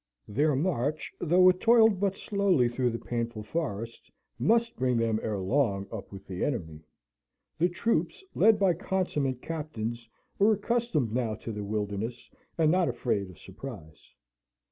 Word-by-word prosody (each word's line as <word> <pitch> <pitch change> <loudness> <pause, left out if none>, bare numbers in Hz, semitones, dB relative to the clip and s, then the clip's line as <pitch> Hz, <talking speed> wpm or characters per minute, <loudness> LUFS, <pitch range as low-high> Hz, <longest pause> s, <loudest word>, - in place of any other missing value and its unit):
Their 145 +7 +2
march, 150 -1 -1
though 180 +2 +5
it 180 0 +2
toiled 225 -3 +5
but 195 -1 0
slowly 195 - +2
through 125 +1 0
the 115 - -3
painful 115 -2 -4
forest, 115 -4 -4 0.3
must 230 - +2
bring 125 -1 +1
them 115 -1 +1
ere 110 -2 -2
long 100 0 +1
up 110 -3 -7
with 95 -1 -10
the 95 -1 -4
enemy; 80 - -3 0.8
the 175 +2 +3
troops, 180 - -1
led 220 0 +5
by 195 -3 +3
consummate 155 -8 -2
captains, 120 -8 -5 0.3
were 210 +2 +5
accustomed 205 - 0
now 115 -3 0
to 115 - -7
the 105 -1 -5
wilderness, 105 +3 -4 0.3
and 160 -2 +4
not 180 -1 +3
afraid 100 -7 -1
of 90 - -14
surprise. 95 - -11
130 Hz, 150 wpm, -28 LUFS, 110-180 Hz, 0.8 s, though